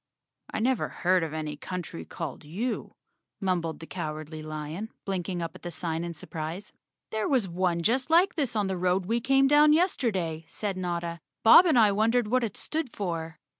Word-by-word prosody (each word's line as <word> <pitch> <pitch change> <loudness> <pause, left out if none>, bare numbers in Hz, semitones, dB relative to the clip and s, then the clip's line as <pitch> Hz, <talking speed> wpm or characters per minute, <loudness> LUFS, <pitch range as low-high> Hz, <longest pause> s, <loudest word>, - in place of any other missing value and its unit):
"I - - -2
never 255 +1 +1
head 185 0 +2
of 165 -2 -2
any 155 -1 -4
country 175 +1 -6
called 160 -4 -6
U," 200 +12 -3 0.5
mumbled 175 -5 -1
the 160 - -8
Cowardly 155 -2 -5
Lion, 155 +7 -5 0.2
blinking 180 -2 -2
up 165 - -4
at - - -13
the 175 - -5
sign 165 -1 -2
in 170 -1 -5
surprise. 160 +5 -6 0.4
"There 220 -1 -1
was 250 -8 +2
one 175 -1 0
just 250 - +1
like 345 +4 +5
this 275 -7 -2
on 210 -2 +1
the 190 -1 -2
road 180 +1 +1
we 230 +4 0
came 270 +2 +4
down 295 +1 +6
yesterday," 200 - +1
said 200 +3 -3
Notta. 170 -2 -3 0.2
"Bob 340 +11 +9
and 310 - +4
I 215 -3 +6
wondered 220 +2 +2
what 255 +1 +2
it 215 -4 -3
stood 310 -5 -3
for." 165 -4 -4
185 Hz, 185 wpm, -28 LUFS, 165-230 Hz, 0.5 s, Bob